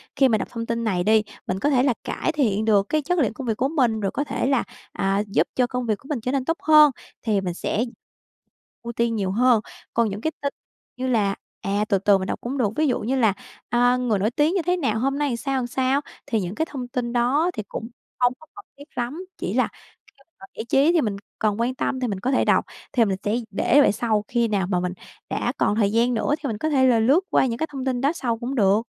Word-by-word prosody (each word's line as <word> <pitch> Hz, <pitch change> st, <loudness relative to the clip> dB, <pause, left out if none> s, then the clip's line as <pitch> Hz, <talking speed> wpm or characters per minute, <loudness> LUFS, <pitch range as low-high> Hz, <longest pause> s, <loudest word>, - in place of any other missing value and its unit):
khi 270 Hz, -1 st, +5 dB
mà 220 Hz, -, +3 dB
đọc -, -, -4 dB
thông 230 Hz, -1 st, -4 dB
tin 230 Hz, 0 st, -2 dB
này 185 Hz, -6 st, 0 dB
đi, 215 Hz, +2 st, +4 dB, 0.2 s
mình 185 Hz, -, -1 dB
có 290 Hz, -, +1 dB
thể 255 Hz, -3 st, +3 dB
là 265 Hz, -2 st, +3 dB
cải -, -, -2 dB
thiện 220 Hz, -9 st, +1 dB
được 205 Hz, -3 st, +4 dB
cái 310 Hz, -, +1 dB
chất 355 Hz, +4 st, 0 dB
lượng 240 Hz, -8 st, +1 dB
công 260 Hz, +1 st, -7 dB
việc 220 Hz, -2 st, 0 dB
của 260 Hz, -, +1 dB
mình, 250 Hz, -8 st, +1 dB
rồi 195 Hz, -2 st, -1 dB
có 285 Hz, -, -1 dB
thể 280 Hz, -, -2 dB
là, 270 Hz, -3 st, +2 dB, 0.3 s
à, 195 Hz, +1 st, 0 dB
giúp 175 Hz, -4 st, +1 dB
cho 250 Hz, -1 st, +2 dB
công 250 Hz, 0 st, -3 dB
việc 215 Hz, -3 st, 0 dB
của 270 Hz, -, -18 dB
mình 290 Hz, -5 st, -1 dB
trở 250 Hz, -, -2 dB
nên 270 Hz, -2 st, -1 dB
tốt 330 Hz, +3 st, 0 dB
hơn 305 Hz, -2 st, +7 dB, 0.3 s
thì 210 Hz, -4 st, +1 dB
mình 180 Hz, -2 st, -3 dB
sẽ 210 Hz, +5 st, -1 dB, 1.0 s
ưu 235 Hz, 0 st, -5 dB
tiên 235 Hz, 0 st, 0 dB
nhiều 195 Hz, -3 st, -1 dB
hơn. 240 Hz, +1 st, +4 dB, 0.3 s
Còn 230 Hz, -2 st, +2 dB
những 205 Hz, +1 st, -5 dB
cái 315 Hz, -, -1 dB
tin 280 Hz, -1 st, -2 dB, 0.4 s
như 260 Hz, +1 st, -2 dB
là, 210 Hz, -5 st, +1 dB, 0.3 s
à, 205 Hz, +2 st, 0 dB
từ 200 Hz, -, +3 dB
từ 200 Hz, +1 st, +4 dB
mình 190 Hz, -, -4 dB
đọc -, -, -3 dB
cũng 260 Hz, +4 st, -4 dB
được, 235 Hz, -6 st, +2 dB
ví 310 Hz, 0 st, +2 dB
dụ 250 Hz, -, +1 dB
như 250 Hz, +5 st, -1 dB
là, 225 Hz, -6 st, +3 dB, 0.4 s
à, 245 Hz, +1 st, +3 dB
người 240 Hz, -5 st, 0 dB
nổi 210 Hz, +4 st, +1 dB
tiếng 300 Hz, +7 st, +2 dB
như 375 Hz, -, +2 dB
thế 360 Hz, +2 st, 0 dB
nào, 225 Hz, -10 st, 0 dB
hôm 275 Hz, +3 st, 0 dB
nay 295 Hz, 0 st, +1 dB
làm 240 Hz, -, -2 dB
sao, 270 Hz, +1 st, -1 dB
làm 245 Hz, -, -2 dB
sao, 260 Hz, +3 st, +1 dB, 0.2 s
thì 230 Hz, -6 st, 0 dB
những 180 Hz, +2 st, -4 dB
cái 320 Hz, -, 0 dB
thông 255 Hz, -4 st, -5 dB
tin 245 Hz, -1 st, -3 dB
đó 265 Hz, +8 st, +2 dB
thì 215 Hz, -, -4 dB
cũng 225 Hz, -, -6 dB, 0.3 s
không 245 Hz, 0 st, +3 dB
có 315 Hz, -, -16 dB
cần 405 Hz, -, -11 dB
thiết 285 Hz, -, -11 dB
lắm, 255 Hz, +9 st, -3 dB
chỉ -, -, -3 dB
là -, -, +2 dB, 0.4 s
khi -, -, -23 dB, 0.3 s
mà -, -, -11 dB
giải 220 Hz, -, -4 dB
trí 285 Hz, +5 st, +4 dB
thì 335 Hz, -, +4 dB
mình 210 Hz, -5 st, -1 dB, 0.2 s
cần 215 Hz, 0 st, 0 dB
quan 250 Hz, +2 st, 0 dB
tâm 260 Hz, -, -2 dB
thì 250 Hz, -, -1 dB
mình 200 Hz, -4 st, -3 dB
có 250 Hz, +7 st, -1 dB
thể 260 Hz, -, +2 dB
đọc, -, -, +3 dB, 0.3 s
thì 235 Hz, -4 st, +4 dB
mình 195 Hz, -2 st, -1 dB
sẽ 205 Hz, +2 st, 0 dB, 0.2 s
để 265 Hz, +7 st, +4 dB
về -, -, +5 dB
sau, 215 Hz, -1 st, 0 dB
khi 235 Hz, -1 st, +1 dB
nào 200 Hz, -4 st, 0 dB
mà 180 Hz, -2 st, +1 dB
mình 180 Hz, 0 st, -2 dB, 0.4 s
đã -, -, -1 dB
còn 205 Hz, -, +2 dB
thời 205 Hz, -2 st, +2 dB
gian 235 Hz, +3 st, +2 dB
nữa 245 Hz, +5 st, +1 dB
thì 295 Hz, -, -4 dB
mình 220 Hz, -4 st, -3 dB
có 310 Hz, +9 st, -1 dB
thể 265 Hz, -3 st, +4 dB
là 240 Hz, -3 st, +4 dB
lướt 270 Hz, +10 st, +4 dB
qua -, -, +3 dB
những 235 Hz, -3 st, -2 dB
cái 320 Hz, -, -1 dB
thông 270 Hz, -2 st, -5 dB
tin 255 Hz, -2 st, -1 dB
đó 280 Hz, +2 st, +3 dB
sau 240 Hz, -8 st, -2 dB
cũng 245 Hz, +4 st, -4 dB
được. 205 Hz, -2 st, +4 dB
240 Hz, 275 wpm, -23 LUFS, 215-270 Hz, 1.0 s, hơn